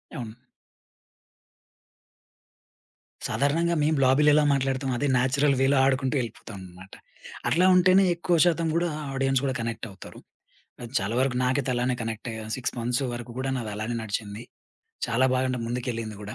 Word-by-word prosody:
అవును. 115 -5 -7 2.9
సాధారణంగా 165 +5 +1
మేము 155 +1 +2
లాబీలో 140 +4 +4
ఎలా 150 - +4
మాట్లాడుతాం, 135 0 -1
అదే 145 - 0
నేచురల్ 135 +3 +2
వేలో 135 +1 +3
ఆడుకుంటూ 135 +1 +1
వెళ్ళిపోతామన్నమాట. 95 -5 -9 0.5
అట్లా 180 +2 +3
ఉంటేనే 185 +1 +5
ఎక్కువ 170 +1 0
శాతం 170 -1 +1
గూడా 170 +1 +1 0.2
ఆడియన్స్ 135 -1 +1
గూడా 135 -2 -1
కనెక్టవుతారు. 115 -4 -7 0.6
అది 120 +1 -9
చాలా 100 +4 -3
వరకు 130 -2 0
నాకైతే 130 +1 0
అలానే 125 +1 0
కనెక్టయ్యాను 110 0 -6
6 130 - -3
మంత్స్ 120 +3 -1
వరకు 120 0 -7
గూడా 130 +1 -2 0.2
అలానే 110 +3 -3
నడిచింది 105 +1 -5 0.6
చాలా 125 +3 +2
బాగా 130 0 +1 0.2
ముందుకెళ్ళింది 115 -3 -4
గూడా. 105 +2 -7
130 Hz, 130 wpm, -26 LUFS, 115-140 Hz, 2.9 s, ఉంటేనే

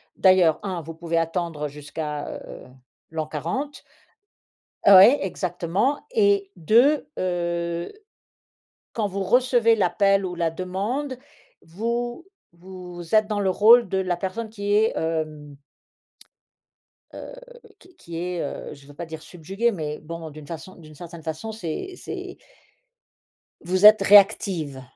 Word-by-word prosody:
d'ailleurs, 185 -5 +4
1 185 -4 -3
vous 165 +2 -9
pouvez 165 0 -3
attendre 165 -2 -2
jusqu'à, 150 +1 -6 0.2
heu, - - -11 0.4
l'an 160 -1 -3
40 170 - -4 1.0
oui, 200 +7 +9
exactement. 185 - -2
Et 405 -4 +2
2, 245 - +3
heu, 170 -1 -2 1.0
quand 220 -3 -1
vous 195 0 -3
recevez 235 +2 +3
l'appel 195 +1 +2
ou 180 - -5
la 170 -1 -1
demande, 200 - -3 0.5
vous 235 - -4 0.3
vous 180 0 -9
êtes 215 -1 +4
dans 210 -2 -1
le 190 - +1
rôle 225 +4 +6
de 190 - -1
la 185 -2 -1
personne 195 +5 -4
qui 205 -2 -4
est, 220 +1 +3
hem, 155 -3 -3 1.6
heu, - - -9 0.5
qui 365 -1 -21
qui 170 -1 -9
est, 175 0 -3
heu, - - -6
je 140 -1 -16
veux 145 - -13
pas 170 +3 -7
dire 160 -1 -9
subjuguée, 195 +9 -2
mais 150 -5 -5
bon 165 +1 -8
d'une 150 -1 -12
façon 170 +3 -8
d'une 155 -2 -15
certaine 170 +1 -10
façon, 160 +8 -5
c'est 220 - -6
c'est - - -8 1.2
vous 185 +3 +1
êtes 215 -1 +9
réactive 195 -8 +4
180 Hz, 130 wpm, -23 LUFS, 165-215 Hz, 1.6 s, oui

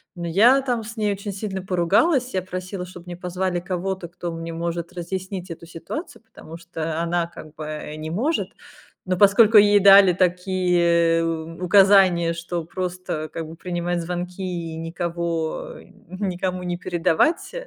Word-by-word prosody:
Но 170 -1 -5
я 230 +11 +5
там 245 -4 -2
с 230 +2 -9
ней 210 -1 +1
очень 200 +1 -6
сильно 195 -1 -4
поругалась. 205 - +2
Я 185 - 0
просила, 185 0 -6
чтобы 180 -1 -12
мне 175 -1 -7
позвали 180 0 -2
кого-то, 185 0 -4
кто 175 0 -6
мне 165 0 -6
может 170 0 -4
разъяснить 185 +1 -5
эту 165 0 -9
ситуацию. 165 - -7
Потому 165 +1 -12
что 165 -1 -4
она, 170 0 0
как 155 -2 -12
бы, 155 - -7
э, 150 0 -6
не 155 0 -6
может. 265 - -1 0.6
Но 185 -1 0
поскольку 210 +3 +6
ей 205 0 +5
дали 195 -2 +8
такие 175 -2 +2
у 165 +1 -4
указания, 190 -3 +5
что 170 0 -4
просто, 180 -3 -4
как 165 -1 -5
бы, 160 - -10
принимать 175 0 -3
звонки 180 +2 -5
и 170 -3 -4
никого, 165 0 -3
э, - - -13 0.3
никому 185 -1 -3
не 175 0 -2
передавать, 175 - 0
180 Hz, 160 wpm, -23 LUFS, 170-190 Hz, 0.6 s, дали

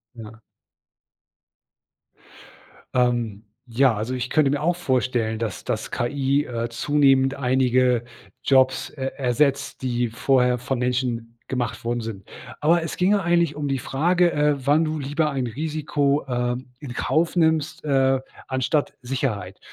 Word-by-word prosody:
Ja. 110 -1 -11 2.5
Ähm, 120 -4 0 0.2
ja. 125 0 +3
Also, 110 +5 -3
ich 125 0 -3
könnte 150 -3 +3
mir 145 0 -1
auch 175 +2 +1
vorstellen, 125 -8 0
dass 110 -5 -4
dass - - -3
KI, 140 +3 0
äh, 115 -1 -3
zunehmend 135 +2 +3
einige 125 -2 +2 0.4
Jobs 130 -1 +3
er 135 -1 -5
ersetzt, 135 +2 0
die 120 -2 -1
vorher 125 +1 +2
von 125 +1 -3
Menschen 125 -2 -1 0.2
gemacht 120 -2 -3
worden 120 0 -1
sind. 110 -4 -6 0.4
Aber 165 +3 +3
es 165 - -5
ginge 195 +3 +3
eigentlich 170 -3 +2
um 145 -1 -3
die 135 - 0
Frage, 175 +7 +2
äh, 150 0 +2
wann 150 +3 +4
du 155 0 -2
lieber 150 +2 0
ein 135 -3 -2
Risiko, 145 +2 -1
äh, 125 -1 -1 0.2
in 135 -5 -7
Kauf 165 +6 0
nimmst, 160 -3 +1
äh, 135 -2 +3 0.3
anstatt 130 +3 0
Sicherheit. 120 -8 -3
130 Hz, 135 wpm, -23 LUFS, 120-150 Hz, 2.5 s, wann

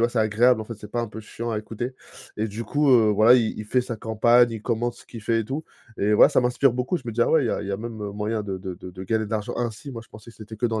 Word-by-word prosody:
«Bah, 120 - +4
c'est 120 - -2
agréable» 110 +3 +3
en - - -9
fait 115 - -7
c'est 105 0 -11
pas 120 +2 -1
un - - -3
peu 110 +1 -8
chiant 115 +2 -6
à 110 - -1
écouter. 115 +4 -5 0.4
Et 110 +1 0
du 110 +3 -6
coup, 145 +3 +1
heu, 115 -4 +6
voilà 110 +4 +6
il 115 -4 +1
il 105 - -6
fait 125 +4 +1
sa 120 -2 -5
campagne, 120 +2 +3
il 110 -2 -6
commente 120 0 -1
ce - - -16
qu'il 115 - -10
fait 115 +2 +1
et - - -3
tout. 140 +8 -4 0.4
Et 105 +1 +2
voilà - - +7
ça - - +3
m'inspire 125 +1 +2
beaucoup, 125 +8 -1
je - - -8
me 115 - -4
dis: 120 - -2
«Ah - - +4
ouais, 155 -4 +4
il 115 - 0
y - - +1
a - - -2
il 100 - -6
y - - -2
a 100 - -1
même, 115 +1 -7
heu, 100 - -4
moyen 105 +1 -2
de 100 -2 -4
de 95 0 -6
de 90 - -10
de 95 +1 -9
gagner 110 +2 0
de - - -12
l'argent 110 -1 -2
ainsi». 120 +4 -4
Moi 115 - -6
je - - -21
pensais 110 +2 -13
que - - -20
c'était 110 0 -9
que 110 - -4
dans 110 -2 0
115 Hz, 350 wpm, -24 LUFS, 105-120 Hz, 0.4 s, voilà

